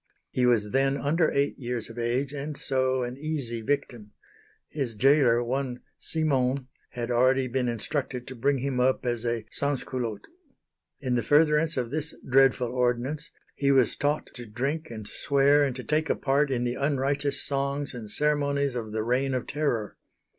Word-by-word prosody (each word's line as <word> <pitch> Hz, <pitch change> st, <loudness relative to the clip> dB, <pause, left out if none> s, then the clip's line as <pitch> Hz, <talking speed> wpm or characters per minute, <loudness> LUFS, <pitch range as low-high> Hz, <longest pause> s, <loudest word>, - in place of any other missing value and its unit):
He 125 Hz, -1 st, +2 dB
was 105 Hz, -4 st, +2 dB
then 135 Hz, +1 st, +2 dB
under 155 Hz, +4 st, +2 dB
eight 140 Hz, +1 st, 0 dB
years 120 Hz, -3 st, -3 dB
of 115 Hz, +1 st, -9 dB
age, 125 Hz, +4 st, -1 dB
and 145 Hz, 0 st, -5 dB
so 130 Hz, -1 st, 0 dB
an 125 Hz, +2 st, -5 dB
easy 140 Hz, -7 st, -3 dB
victim. 120 Hz, -4 st, -3 dB, 0.5 s
His 135 Hz, -7 st, -4 dB
gaoler, 130 Hz, -1 st, +4 dB
one 125 Hz, 0 st, -3 dB, 0.2 s
Simon, 135 Hz, -4 st, 0 dB, 0.2 s
had 120 Hz, 0 st, -3 dB
already 130 Hz, +2 st, +3 dB
been 125 Hz, 0 st, -1 dB
instructed 125 Hz, +2 st, -3 dB
to 130 Hz, -, -8 dB
bring 140 Hz, +4 st, +1 dB
him 130 Hz, 0 st, -2 dB
up 130 Hz, +1 st, +2 dB
as 120 Hz, -1 st, -1 dB
a 115 Hz, -2 st, -2 dB
"sansculotte." 130 Hz, -5 st, +1 dB, 0.8 s
In 130 Hz, -3 st, -1 dB
the 120 Hz, -, +2 dB
furtherance 150 Hz, +5 st, +3 dB
of 125 Hz, -2 st, -2 dB
this 155 Hz, +1 st, -3 dB
dreadful 130 Hz, -2 st, +3 dB
ordinance 125 Hz, +5 st, 0 dB, 0.2 s
he 140 Hz, -, 0 dB
was 130 Hz, -5 st, +3 dB
taught 145 Hz, +1 st, 0 dB
to 120 Hz, -3 st, -9 dB
drink 135 Hz, +9 st, -2 dB
and 110 Hz, -3 st, -7 dB
swear 140 Hz, +1 st, +3 dB
and 135 Hz, -3 st, -1 dB
to 125 Hz, -, -6 dB
take 155 Hz, +3 st, 0 dB
a -, -, +2 dB
part 140 Hz, +1 st, +1 dB
in 125 Hz, -2 st, 0 dB
the 120 Hz, 0 st, -1 dB
unrighteous 140 Hz, +1 st, 0 dB
songs 140 Hz, 0 st, -2 dB
and 115 Hz, -4 st, -8 dB
ceremonies 140 Hz, 0 st, +1 dB
of 115 Hz, -3 st, -4 dB
the 110 Hz, 0 st, -1 dB
Reign 130 Hz, +3 st, 0 dB
of 125 Hz, -, -2 dB
Terror. 140 Hz, -8 st, -2 dB
130 Hz, 170 wpm, -27 LUFS, 120-140 Hz, 0.8 s, gaoler